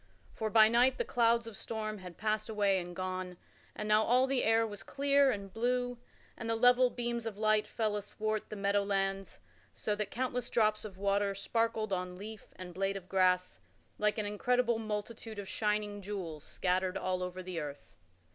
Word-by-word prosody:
For 220 - -2
by 215 0 +7
night 245 +3 +4
the - - -1
clouds 235 -1 +3
of 230 -2 -8
storm 215 0 -4
had 180 -2 -10
passed 215 0 -1
away 200 -3 +2
and 175 0 -7
gone, 185 -1 -4 0.4
and 210 - -4
now 215 0 +5
all 250 +4 +4
the 265 -1 0
air 225 0 +4
was 205 -2 -6
clear 280 0 +3
and 200 -5 -3
blue, 245 +1 0 0.4
and 225 - -5
the 225 - +2
level 245 +2 +5
beams 235 -1 -3
of 210 -3 -5
light 215 0 +2
fell 215 -2 -1
athwart 215 +1 -3
the - - -5
meadow 200 0 +2
lands 195 -1 -1 0.4
so 210 - -2
that 205 -1 -2
countless 250 0 -2
drops 215 -2 +2
of 195 -3 -8
water 200 0 +1
sparkled 220 +1 0
on 180 -1 -2
leaf 210 +3 -9
and 180 -1 -8
blade 195 +2 -1
of 185 -2 -10
grass, 180 - +2 0.4
like 210 0 +2
an 215 - -1
incredible 235 +3 +1
multitude 220 +1 -5
of 200 -1 -5
shining 210 -1 -1
jewels 180 -7 -5
scattered 185 0 0
all 185 0 -1
over 180 0 -4
the 180 -2 -4
earth. 145 -2 -7
210 Hz, 185 wpm, -32 LUFS, 195-230 Hz, 0.4 s, by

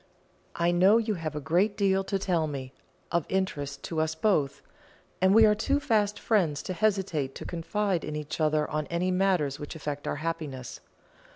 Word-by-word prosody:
I 170 +1 +2
know 185 +5 +5
you 225 -2 0
have 160 -5 -4
a - - -2
great 175 +8 +1
deal 195 -1 +2
to 195 - -1
tell 175 -5 0
me, 135 -3 -6 0.4
of 170 -3 0
interest 145 -7 -2
to 160 -2 -1
us 160 0 -1
both, 160 -6 +1 0.6
and 190 0 +5
we 220 +2 +7
are 210 - +5
too 275 +7 0
fast 215 -7 +1
friends 170 -10 +1
to 185 - -4
hesitate 185 -9 0
to - - -7
confide 180 +2 -1
in 150 - -4
each 150 +1 -5
other 155 -1 +2
on 155 -1 -3
any 175 +2 0
matters 180 -7 +1
which 145 +3 -7
affect 145 -2 -5
our - - -1
happiness. 150 -5 -5
170 Hz, 185 wpm, -28 LUFS, 150-195 Hz, 0.6 s, we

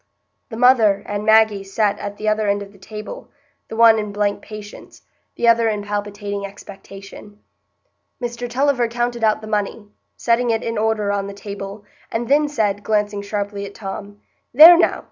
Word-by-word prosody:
The 225 - -7
mother 225 -5 +4
and 205 0 -4
Maggie 220 -2 +4
sat 205 +1 -1
at 205 0 -6
the 215 - -5
other 215 0 +1
end 200 0 0
of 200 - -13
the 200 - -20
table, 215 - -9 0.4
the - - -8
one 225 -1 +6
in 210 -1 -4
blank 205 0 -1
patience, 210 -1 -11 0.3
the 235 - 0
other 230 -1 +4
in 210 -1 -3
palpitating 205 0 -4
expectation. 200 +1 -11 0.8
Mr 240 -1 -5
Tulliver 260 -1 +1
counted 240 0 -3
out 215 0 +2
the - - -9
money, 210 0 -3 0.3
setting 240 +1 +1
it 225 0 0
in 230 - -3
order 215 -2 0
on 200 -1 -2
the 200 - -8
table, 200 0 -8 0.3
and 230 +1 -3
then 295 +2 +3
said, 205 -7 -1
glancing 210 -1 -1
sharply 200 0 -4
at 200 - -13
Tom: 205 0 -8 0.4
"There 325 +5 +11
now! 340 - +2
210 Hz, 175 wpm, -20 LUFS, 200-230 Hz, 0.8 s, There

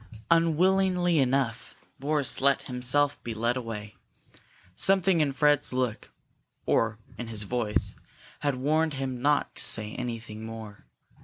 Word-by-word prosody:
Unwillingly 175 +1 +3
enough, 130 -3 0 0.2
Boris 145 -1 0
let 140 0 +3
himself 135 +3 0
be 115 -2 -5
led 115 +2 0
away. 110 -4 -6 0.8
Something 190 - +3
in 145 -2 +1
Fred's 145 0 +2
look, 125 -3 -2 0.6
or 115 -1 +1 0.2
in 120 - -5
his 110 -2 +1
voice, 110 -1 -1 0.5
had 145 -2 0
warned 155 +3 +1
him 130 -2 -4
not 145 +1 +1
to - - -1
say 110 -1 +3
anything 115 -3 -6
more. 110 -2 -9
130 Hz, 130 wpm, -27 LUFS, 115-150 Hz, 0.8 s, Unwillingly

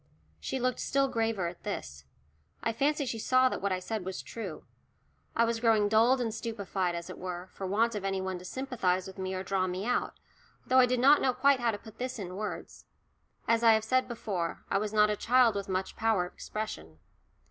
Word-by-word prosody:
She 265 - -3
looked 255 0 0
still 275 0 +1
graver 225 -6 -1
at 170 0 -8
this. 70 - -6 0.6
I 230 - 0
fancy 285 +4 +1
she 230 -3 -3
saw 255 +3 +4
that - - -4
what 200 0 0
I 185 - +1
said 205 +2 -4
was 190 0 -5
true. 195 -9 -7 0.7
I 230 - +4
was 230 0 -1
growing 225 -3 +3
dulled 230 +5 +4
and 230 -3 -1
stupefied, 200 -6 -2
as 170 0 -5
it 185 - -9
were, 180 0 -5
for 190 - -5
want 225 +5 +2
of 205 -2 -4
any 195 -1 -1
one 190 -1 -3
to - - -12
sympathise 190 -7 -1
with 190 0 -10
me 190 0 -3
or 185 - -3
draw 190 0 0
me 185 +2 -3
out, 245 - 0 0.5
though 260 +1 +4
I 250 - +6
did 250 0 +1
not 280 +4 +6
know 260 - +2
quite 275 +1 +4
how 240 -1 +1
to 215 - -1
put 220 +1 -14
this 255 0 -3
in 185 -3 -6
words. 210 +2 -6 0.6
As 230 0 +3
I 230 -1 +7
have 220 0 +2
said 255 +3 +1
before, 195 -8 -3
I 195 - +3
was 210 0 -2
not 210 0 +4
a - - 0
child 245 +1 +4
with 200 -1 -4
much 185 0 -2
power 220 -5 +1
of 180 - -11
expression. 80 - -6
215 Hz, 225 wpm, -30 LUFS, 185-240 Hz, 0.7 s, I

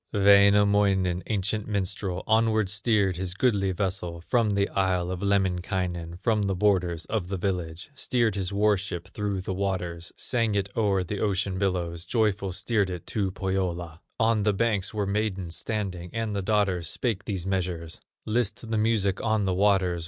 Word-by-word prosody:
Wainamoinen, 100 -2 +4
ancient 105 0 -1
minstrel, 95 -2 -2
Onward 110 -2 +2
steered 100 -3 +1
his 95 0 -3
goodly 100 -4 +2
vessel, 90 -3 -3
From 115 -4 +2
the 100 0 +2
isle 90 -2 0
of 90 0 -4
Lemminkainen, 90 -3 -1
From 110 -3 +2
the 100 -1 0
borders 90 -4 +1
of 105 -5 -2
the 95 +1 -3
village; 90 - -3
Steered 120 -5 +1
his 95 -1 -2
war 105 +1 +3
ship 95 -1 -6
through 100 -1 -2
the 95 - -3
waters, 90 -3 -3
Sang 115 -4 0
it 100 0 -2
o'er 100 -4 +2
the 100 +3 -4
ocean 95 -2 0
billows, 85 -4 -1
Joyful 100 -2 +1
steered 100 +1 0
it 90 -2 -6
to 100 -3 -1
Pohyola. 90 -4 -3 0.2
On 115 -1 +3
the 105 0 +2
banks 105 -2 0
were 105 -2 -1
maidens 100 -4 -2
standing, 95 -5 -3
And 115 -2 -2
the 100 - -1
daughters 95 -5 +1
spake 110 -5 -2
these 95 -4 -3
measures: 90 -4 -2 0.3
"List 110 0 -1
the 110 - +1
music 105 -4 +1
on 110 -2 +1
the 95 - +1
waters! 95 -2 +2
100 Hz, 165 wpm, -26 LUFS, 90-105 Hz, 0.3 s, Wainamoinen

